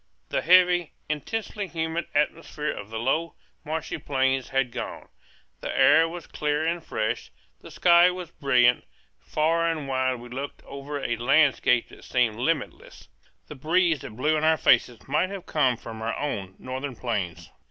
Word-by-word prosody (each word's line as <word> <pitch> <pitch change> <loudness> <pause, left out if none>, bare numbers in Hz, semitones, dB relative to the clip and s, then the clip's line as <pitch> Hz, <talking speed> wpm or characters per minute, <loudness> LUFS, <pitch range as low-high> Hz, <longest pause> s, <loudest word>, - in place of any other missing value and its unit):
The - - 0
heavy, 180 -1 +4 0.2
intensely 205 +6 -3
humid 160 0 -3
atmosphere 150 0 -1
of 105 0 -8
the 110 - -5
low, 155 +8 -1 0.3
marshy 160 +1 -4
plains 135 -2 0
had 135 -2 0
gone; - - -6 0.5
the - - -5
air 165 0 +6
was 175 0 -8
clear 150 +1 -1
and 170 0 -1
fresh; 110 -2 -3 0.3
the - - -12
sky 175 0 +5
was 180 -2 -6
brilliant; 125 -5 +3 0.4
far 165 - +1
and 155 -4 -3
wide 130 -1 0
we 120 0 -10
looked 135 +3 -6
over 140 +1 -6
a 120 -3 -2
landscape 130 -1 +3
that - - -15
seemed 120 -4 +1
limitless; 135 - -3 0.4
the - - -9
breeze 165 +3 +2
that 125 -6 -9
blew 150 +6 +1
in 155 - -1
our 160 0 +4
faces 120 -3 +2
might 155 +7 +1
have 195 -2 -7
come 130 -6 +1
from 110 -1 -9
our 115 +1 -2
own 100 -10 -4
northern 130 +1 -5
plains. 90 - -4
145 Hz, 165 wpm, -26 LUFS, 125-165 Hz, 0.5 s, air